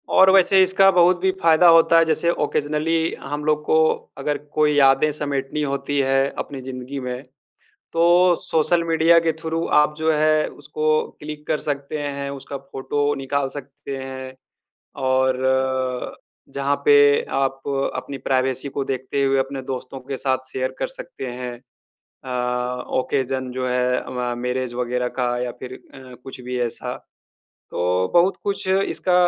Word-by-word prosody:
और 190 - +7
वैसे 190 0 +5
इसका 190 +1 +4
बहुत 180 0 +4
भी 190 0 +2
फायदा 165 +1 +5
होता 165 0 +6
है। 165 - +4
जैसे 160 +1 +1
ऑकेज़नली 155 +3 0
हम 145 +2 -4
लोग 150 -1 +1
को 160 - +3 0.4
अगर 145 +2 -1 0.2
कोई 150 -1 +3
यादें 140 +1 +4
समेटनी 145 0 -2
होती 140 0 -2
है 135 0 +2
अपनी 135 -2 -5
जिंदगी 130 +1 -6
में, 125 +1 -5 0.7
तो 175 +1 +4
सोशल 170 +2 +1
मीडिया 165 +1 +4
के 165 -1 +1
थ्रू 165 +1 -2 0.2
आप 150 0 0
जो 160 0 +1
है 155 0 +3
उसको 155 +1 -1 0.2
क्लिक 150 0 -8
कर 155 - +1
सकते 145 0 -3
हैं, 140 -1 -4
उसका 140 0 -7
फ़ोटो 145 +2 -2
निकाल 140 0 -1
सकते 140 0 -8
हैं। 130 0 -7 0.7
और 130 0 +2
अ, 130 -1 0 0.4
जहाँ 140 +1 0
पे 145 0 +6
आप 135 0 0 0.3
अपनी 140 - -5
प्राइवेसी 130 +1 0
को 140 - 0
देखते 135 +1 -2
हुए 135 0 +2
अपने 135 0 -2
दोस्तों 130 +1 -6
के 130 +1 -5
साथ 130 0 -2
शेयर 130 0 -2
कर - - -1
सकते 135 - -7
हैं। 125 0 -5 0.7
अ, 130 - -9 0.7
ऑकेज़न 130 0 -2
जो 130 0 -3
है 125 0 0
म 125 -1 -2
मैरेज़ 125 0 -3
वगैरह 125 0 -1
का 120 -1 0
या 125 - -3
फिर 130 0 -7
अ, 130 -1 -13
कुछ 135 -1 -9
भी 125 0 -4
ऐसा। 120 -1 -3 0.8
तो 90 +1 0
बहुत 175 +3 +4
कुछ 200 -1 -2
इसका 190 -1 +1
140 Hz, 155 wpm, -22 LUFS, 130-155 Hz, 0.8 s, और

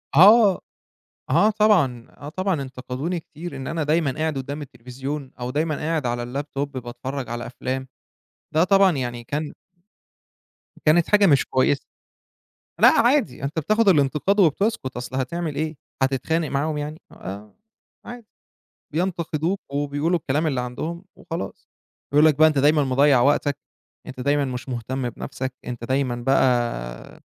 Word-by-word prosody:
آه، 200 +4 +7 0.7
آه 215 - +5
طبعًا، 180 - +2
آه 145 - -11
طبعًا، 185 -2 -1
انتقدوني 130 +6 -4
كتير 165 +1 -9
إن 135 - -6
أنا 160 -1 -2
دايمًا 150 -2 +1
قاعد 155 -2 -1
قدّام 140 +3 -5
التليفزيون، 135 +2 -7
أو 125 0 -3
دايمًا 155 +2 0
قاعد 155 -3 -1
على 120 0 -1 0.2
الlaptop 140 -1 -5 0.2
باتفرّج 125 +2 -6
على 120 +1 -4
أفلام، 130 +1 -4 0.7
ده 160 +2 +5
طبعًا 195 -3 +4
يعني 120 -2 -4
كان 150 +3 -3 1.3
كانت 160 +2 +4
حاجة 205 -1 +5
مش 145 -7 +4
كويسة. 130 +2 +2 1.0
لأ - - +8
عادي 245 - +1
أنت 150 +4 -2
بتاخد 215 +7 +3
الانتقاد 150 +5 +2
وبتسكت، 175 - +1
أصل 125 +1 -6
هتعمل 150 +4 -2
إيه؟ 155 +1 -2 0.3
هتتخانق 140 +5 0
معاهم 150 +2 -1
يعني؟! 150 +2 -5
آه، 100 +2 -9 0.5
عادي، 240 -2 -9 0.7
بينتقدوك 170 0 -1
وبيقولوا 145 +4 0
الكلام 150 +2 0
اللي 130 -5 0
عندهم 160 +9 -5
وخلاص، 165 - -7 0.4
بيقول 150 +2 +5
لك 155 -2 +5
بقى: 155 - +7
"أنت 155 -2 +1
دايمًا 150 +2 +4
مضيّع 135 0 +4
وقتك، 145 +1 +2 0.5
أنت 130 -1 -8
دايمًا 140 +2 +1
مش 125 0 -5
مهتم 125 +1 -3
بنفْسك، 130 +3 -6
أنت 120 -1 -6
دايمًا 130 0 0
بقى 120 - 0
145 Hz, 140 wpm, -23 LUFS, 130-165 Hz, 1.3 s, لأ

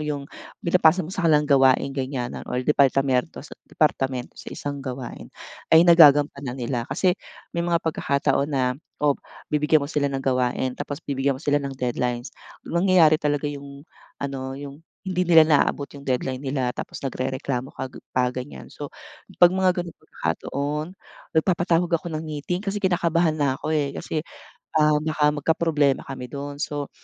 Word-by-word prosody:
yung 150 -2 -3 0.4
pinapasa 170 0 +4
mo 180 - -8
sa 175 -4 +1
kanilang 150 -1 +4
gawain 135 -1 +4
ganyan, 130 -2 -3 0.2
o 125 - -2
departamiento 135 -3 +2 0.2
departamento 130 -2 0
sa - - -9
isang 140 -1 -5
gawain. 125 - -7 0.4
Ay 160 +2 +7
nagagampanan 145 -5 +5
nila. 120 -1 -3
Kasi 185 -2 +2 0.4
may 170 - -1
mga 170 -1 0
pagkakataon 140 -2 0
na 135 -3 0 0.4
o 145 -1 +4 0.4
bibigyan 150 +1 +3
mo - - -6
sila 145 -2 0
ng 135 - -2
gawain 125 0 0
tapos 145 +1 -5
bibigyan 135 -1 0
mo - - -12
sila 145 -2 +1
ng 140 -1 -4
deadlines, 125 0 -2 0.3
nangyayari 170 -3 +4
talaga 145 0 0
yung 140 0 -9 0.4
ano 135 -1 -4
yung 140 +1 -9 0.2
hindi 185 -1 -1
nila 165 -2 +6
naaabot 145 -1 +2
yung 140 - -11
deadline 130 0 -1
nila 130 -2 -1
tapos - - -6
nagrereklamo 130 0 -3
ka 130 - -5 0.2
pa 125 -1 +2
ganyan. 70 - -7
So - - -8 0.5
pag 175 - +9
mga 185 0 +2
ganun 170 -2 -8
pagkakataon 150 +2 -3 0.5
nagpapatawag 170 +1 +2
ako 165 +1 -7
ng 155 - -2
meeting 155 +5 -3
kasi 205 0 -3
kinakabahan 170 -4 +2
na 135 -2 +2
ako 155 - -3
eh. 145 -3 0
Kasi 155 - -3 0.5
ah, 150 -1 +4
baka 155 -1 +1
magkaproblema 150 -2 +1
kami 130 -2 -7
dun. 140 +2 -7
So 145 -1 -3
145 Hz, 155 wpm, -24 LUFS, 135-160 Hz, 0.5 s, pag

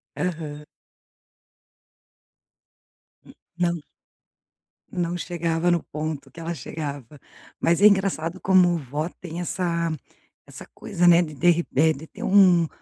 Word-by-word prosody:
Aham. 155 -4 -4 2.6
Hum, - - -15 0.2
não 175 -2 0 1.1
Não 175 0 -2
chegava 170 -1 -1
no 170 - +1
ponto 155 -1 -5
que - - -13
ela 165 +1 -4
chegava. 145 -2 -7 0.4
Mas, 170 +1 +2
é - - +7
engraçado 190 -4 0
como 180 -2 +4
vó 150 +4 -4
tem 175 -1 -6
essa 170 -2 -1 0.5
essa - - -11
coisa, 175 +1 0
né, 175 0 +7
de 155 -3 -4
de 175 +5 +3
re 170 0 -1
eh, 160 +3 +4
de 155 +4 -11
ter - - -10
um 185 -4 +5
170 Hz, 125 wpm, -24 LUFS, 155-175 Hz, 2.6 s, é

